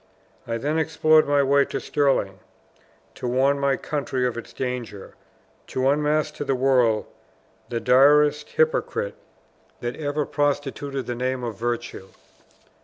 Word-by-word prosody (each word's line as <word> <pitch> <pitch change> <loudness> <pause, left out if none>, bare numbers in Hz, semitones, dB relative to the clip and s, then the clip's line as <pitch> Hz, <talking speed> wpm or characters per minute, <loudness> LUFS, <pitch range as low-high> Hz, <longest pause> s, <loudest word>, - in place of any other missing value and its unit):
I 115 0 -2
then 150 +6 -1
explored 155 -1 +3
my 145 -1 +3
way 140 +1 +4
to - - -4
Stirling, 120 -9 0 0.7
to 125 - -5
warn 135 +3 +2
my 140 -1 +1
country 135 -4 -2
of 125 - -1
its 120 - -8
danger 125 -6 -5 0.5
to 130 0 -1
unmask 150 +1 +1
to - - -3
the 135 -2 0
world 125 -4 +2 0.6
the 120 - -2
direst 145 +4 +4
hypocrite 475 0 0 0.7
that 120 0 -4
ever 150 -1 -2
prostituted 145 -1 -2
the 120 - -3
name 125 +1 -2
of 115 -3 -4
virtue." 120 -5 -4
135 Hz, 135 wpm, -24 LUFS, 125-150 Hz, 0.7 s, way